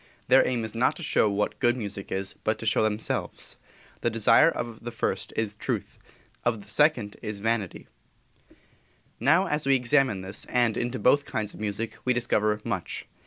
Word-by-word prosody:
Their 130 +1 +7
aim 120 -3 -1
is 110 - -4
not 115 +2 +2
to - - -8
show 110 - +2
what 105 +1 -1
good 120 +1 +2
music 100 -4 -5
is, 95 +1 -2
but 110 - 0
to - - -8
show 110 - +3
themselves. 110 0 -2 0.5
The - - +1
desire 115 +7 +5
of 120 -8 -5
the 120 - -4
first 115 - -2
is 110 -2 -2
truth, - - -4 0.4
of 115 -3 0
the 100 - -15
second 120 -4 +2
is 105 -2 -5
vanity. 110 -3 -2 1.3
Now, 165 +7 +4
as 150 -5 -1
we 135 - +5
examine 130 -3 +3
into 95 0 -8
this, 95 - -2
and 120 -3 +1
into 120 +2 -2
both 140 +3 +3
kinds 105 -1 -3
of - - -12
music, 110 +1 -3
we 125 - +2
discover 110 -3 +1
much. 100 -7 -4
115 Hz, 185 wpm, -27 LUFS, 105-125 Hz, 1.3 s, Their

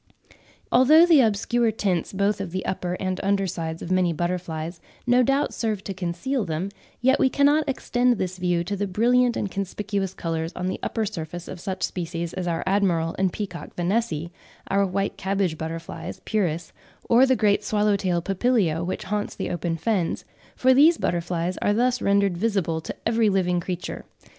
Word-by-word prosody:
Although 305 +7 +7
the 325 -5 +6
obscure 230 +1 +2
tints 190 -6 -1
both 200 +1 0
of 195 - -4
the 185 +2 -4
upper 180 -1 -2
and 185 0 -3
under 195 0 +1
sides 165 -3 -4
of 175 - -5
many 185 -2 +3
butterflies 170 -1 -3 0.2
no 245 0 +4
doubt 275 +3 +1
serve 215 -4 -2
to 195 - -4
conceal 185 +8 -2
them, 170 +2 -3 0.3
yet 260 +2 +4
we 265 - +4
cannot 290 +2 +3
extend 245 -2 +1
this 185 -1 -3
view 175 -1 +1
to 200 +4 -3
the 200 +1 -2
brilliant 240 +5 +3
and 200 - -2
conspicuous 195 0 -3
colours 165 0 -3
on 180 - -3
the 185 - -2
upper 225 -2 -1
surface 175 -3 -6
of 180 - -7
such 190 +1 -4
species 170 -1 -3
as 185 -1 -3
our 165 -1 -1
admiral 180 -4 +1
and 190 -1 +2
peacock 185 -4 -6
Vanessae, 175 -3 -1 0.4
our 200 0 +3
white 195 +2 -2
cabbage 190 -3 0
butterflies 165 +1 -6
(Pieris), 175 -6 -1 0.4
or 245 +3 +6
the 260 - +4
great 210 -2 +2
swallow 210 0 +2
tail 180 -3 0
Papilio 195 -5 +1
which 185 +4 -3
haunts 210 +1 -3
the - - -3
open 170 -1 -2
fens—for 215 +7 0
these 310 +5 +6
butterflies 175 +1 -1
are 205 - +2
thus 245 +2 +1
rendered 200 -2 +2
visible 175 -5 0
to - - -6
every 225 -1 +3
living 180 -2 +1
creature. 180 0 -5
190 Hz, 175 wpm, -24 LUFS, 175-220 Hz, 0.4 s, Although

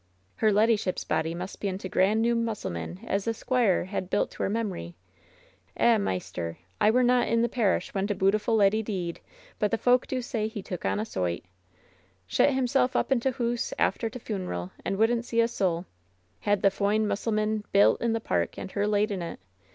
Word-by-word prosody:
"Her 215 - +3
leddyship's 210 -2 +2
body 160 +1 -1
must 180 +2 -6
be 205 - -1
in 185 -1 -2
t' 190 - -6
grand 200 +5 +2
new 235 0 +2
mus^ 230 -2 -2
selman 85 +1 -5
as 195 0 -1
the 230 0 -1
squire 240 -8 +1
had 185 -1 -4
built 205 - +1
to - - -8
her - - +1
memory. 195 - -3 0.8
Eh, 235 -2 +4
maister, 90 - -3 0.2
I - - +6
were 250 +3 +4
not 250 0 +3
i' 230 - +1
the 230 +1 +3
parish 225 -5 0
when 195 0 0
t' 205 - -1
bootiful 205 +4 +2
leddy 210 +1 +4
deed; 185 -6 -4 0.4
but 210 - +2
the 225 - 0
folk 245 +2 +3
do 260 - -2
say 220 -3 -2
he 220 -3 -6
took 180 - -6
on - - +1
a 215 - -1
soight 90 - -2
I - - -36 0.8
Shet 90 - +3
him 260 -1 +1
self 255 0 +1
up - - 0
in 265 - +4
t' 265 - +1
hoose 240 -1 -2
after 225 - +1
t' 250 - -8
funeral 185 - -4
and 195 - -2
wouldn't 230 +2 +2
see 230 - -1
a 230 - +5
soul! 185 -6 -1 0.5
Had 205 -1 0
the 195 - +7
f - - -17
oine 210 +2 +2
musselman 215 0 0
built 200 +1 +5
in 235 -1 +1
the 225 - 0
park 85 - -1
and 190 - -6
her 205 0 0
laid 210 +1 +2
in 190 -3 -3
it! 170 - -6
210 Hz, 220 wpm, -27 LUFS, 185-230 Hz, 0.8 s, the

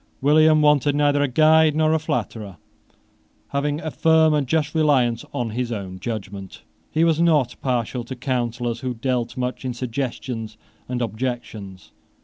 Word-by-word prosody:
William 155 +2 +4
wanted 145 -1 +3
neither 145 -1 +2
a 145 - +2
guide 155 +3 +4
nor 155 0 +2
a 160 - +2
flatterer. 110 - -4 0.9
Having 145 +2 -1
a 155 - -4
firm 160 0 +4
and 145 -3 0
just 150 +2 0
reliance 135 -7 +2
on 120 -2 -3
his 120 +1 -3
own 95 -4 -5
judgment, 100 -4 -6 0.3
he 160 - +1
was 165 -1 +2
not 150 -7 +2
partial 125 -1 -1
to 130 - -6
counsellors 120 -2 -2
who 125 -1 -4
dealt 120 0 -2
much 125 +1 -3
in 125 -2 -3
suggestions 120 -3 -4 0.3
and 125 -1 -1
objections. 110 -6 -5
130 Hz, 150 wpm, -22 LUFS, 120-150 Hz, 0.9 s, William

